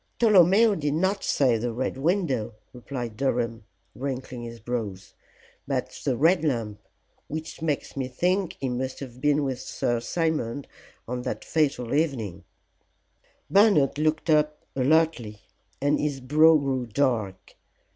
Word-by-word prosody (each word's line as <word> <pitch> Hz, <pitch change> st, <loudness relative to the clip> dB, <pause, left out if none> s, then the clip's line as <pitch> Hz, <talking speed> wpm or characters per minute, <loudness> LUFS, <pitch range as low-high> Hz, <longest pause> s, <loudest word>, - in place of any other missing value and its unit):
"Tolomeo 210 Hz, 0 st, +5 dB
did 150 Hz, -5 st, -1 dB
not 190 Hz, +4 st, 0 dB
say 125 Hz, -5 st, +2 dB
the 120 Hz, +1 st, -2 dB
Red 125 Hz, +3 st, -2 dB
Window," 135 Hz, -, 0 dB, 0.2 s
replied 125 Hz, -2 st, -6 dB
Durham, 115 Hz, -4 st, -1 dB, 0.3 s
wrinkling 130 Hz, -2 st, -5 dB
his 115 Hz, 0 st, -8 dB
brows, 110 Hz, -5 st, -5 dB, 0.5 s
"but -, -, -3 dB
the 130 Hz, -4 st, 0 dB
Red 165 Hz, +5 st, +3 dB
Lamp, 115 Hz, -8 st, -1 dB, 0.5 s
which 155 Hz, +2 st, -6 dB
makes 155 Hz, -3 st, -2 dB
me 135 Hz, -2 st, -2 dB
think 180 Hz, +8 st, 0 dB
he 135 Hz, -, -2 dB
must 130 Hz, +1 st, -3 dB
have 125 Hz, -2 st, -9 dB
been 150 Hz, 0 st, +2 dB
with 130 Hz, -2 st, -2 dB
Sir 120 Hz, -2 st, -1 dB
Simon 145 Hz, -2 st, -2 dB, 0.4 s
on 125 Hz, +1 st, -3 dB
that -, -, -5 dB
fatal 140 Hz, -6 st, 0 dB
evening." 120 Hz, -, -1 dB, 1.0 s
Bernard 195 Hz, -9 st, +4 dB
looked 155 Hz, +1 st, +1 dB
up 150 Hz, 0 st, +1 dB
alertly, 135 Hz, -6 st, +1 dB, 0.4 s
and 145 Hz, +1 st, +1 dB
his 145 Hz, -2 st, -1 dB
brow 155 Hz, +5 st, +5 dB
grew 135 Hz, -4 st, -2 dB
dark. 110 Hz, -6 st, -1 dB
135 Hz, 135 wpm, -26 LUFS, 120-155 Hz, 1.0 s, Tolomeo